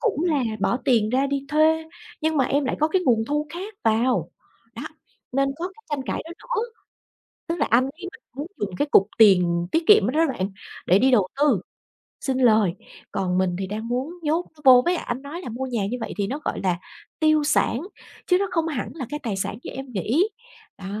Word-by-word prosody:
cũng 410 -8 0
là 300 -6 +2 0.2
bỏ 235 - +2
tiền 230 -6 +3
ra 265 +2 +2
đi 280 0 -2
thuê 315 +1 +3 0.4
nhưng 315 -1 0
mà 265 - +3
em 285 +3 +1
lại 260 - -1
có 310 - +3
cái 370 +3 +1
nguồn 225 -3 +3
thu 295 +3 -1
khác 385 +6 -7
vào". 230 +3 +2 0.4
Đó, - - -7 0.5
nên 275 +1 +2
có 350 +2 -3
cái 415 +4 -19
tranh 290 -2 -1
cãi - - -2
đó 330 - -10
nữa, 485 -3 -2 0.9
tức 335 - -1
là 290 - +2
anh 235 +3 +5
ấy 315 +8 -6
anh - - -16
muốn 290 +4 -5
dùng 195 -3 -3
cái 290 - +1
cục 195 - +6
tiền 180 -5 +5
tiết 325 - +2
kiệm 425 +1 +7
đó - - -1
đó 330 - +5
bạn, 190 -2 -3 0.3
để 185 +3 +4
đi 265 +2 +4
đầu 205 -7 +4
tư, 275 - +3 0.6
sinh 265 -2 -1
lời, 220 -7 +4 0.4
còn 185 -2 -1
mình 185 -1 +1
thì 190 - -3
đang 215 +3 -5
muốn 255 +7 -2
nhốt 320 +4 0
nó - - -18
vô, 255 -2 +8
với 350 - +2
lại - - -4
anh 250 +3 -3
nói 295 +5 -7
là 360 - -7
mua 255 +3 -4
nhà 230 -6 -1
như 240 - -3
vậy 225 - -4
thì 200 - +1
nó 270 +8 -3
gọi - - -2
là 180 -2 +1 0.4
tiêu 310 -1 +4
sản, 290 -4 +2 0.5
chứ 360 - +4
nó 395 - 0
không 330 -1 0
hẳn 280 -6 -3
là 275 -7 -5
cái 295 - -4
tài 215 -6 -2
sản 200 +2 -3
như - - -6
em 270 +1 -7
nghĩ, 245 - +1 0.5
đó. 190 - -9
265 Hz, 230 wpm, -24 LUFS, 220-315 Hz, 0.9 s, vô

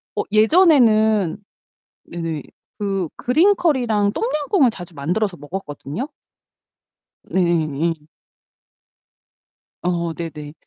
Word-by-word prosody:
어 - - 0
예전에는 220 - +4 0.7
네. 165 -4 -4 0.4
그 195 -4 -1
그린 345 +11 +3
커리랑 225 -10 +1
똠양꿍을 300 - +1
자주 175 -5 -10
만들어서 175 +7 -1
먹었거든요. 150 - -6 1.2
네. 190 - -1 0.5
예. 155 -2 -7 1.7
어 170 -2 -1
네네. 150 -3 -7
200 Hz, 180 characters per minute, -20 LUFS, 165-245 Hz, 1.7 s, 예전에는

